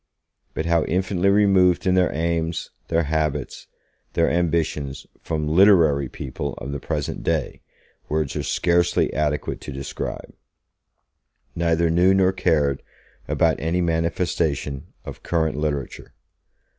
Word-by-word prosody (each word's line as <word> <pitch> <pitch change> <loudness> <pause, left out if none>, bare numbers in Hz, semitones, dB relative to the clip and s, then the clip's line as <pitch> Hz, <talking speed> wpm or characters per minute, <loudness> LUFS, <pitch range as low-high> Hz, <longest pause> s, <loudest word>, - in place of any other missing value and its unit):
But 80 - -2
how 85 -1 +2
infinitely 95 +2 +1
removed 95 -3 +4
in 95 - +3
their 90 -1 +3
aims, 80 +1 -2 0.2
their 85 0 +1
habits, 75 -3 -2 0.5
their - - +2
ambitions 80 -5 -1 0.2
from 75 -2 -2
'literary' 80 -6 +4
people 70 +1 -5
of 70 - -7
the 70 - -4
present 75 0 -3
day, - - -2 0.5
words 75 -2 -1
are - - -1
scarcely 85 0 +1
adequate 75 0 -1
to 75 - -7
describe. 70 0 -6 1.2
Neither 85 0 +1
knew 90 +3 +4
nor 95 -1 +4
cared 80 -7 +1 0.5
about 80 -1 +1
any 85 +3 0
manifestation 80 -4 -1 0.2
of - - -8
current 80 -2 0
literature. 75 -3 -4
80 Hz, 120 wpm, -23 LUFS, 75-85 Hz, 1.2 s, removed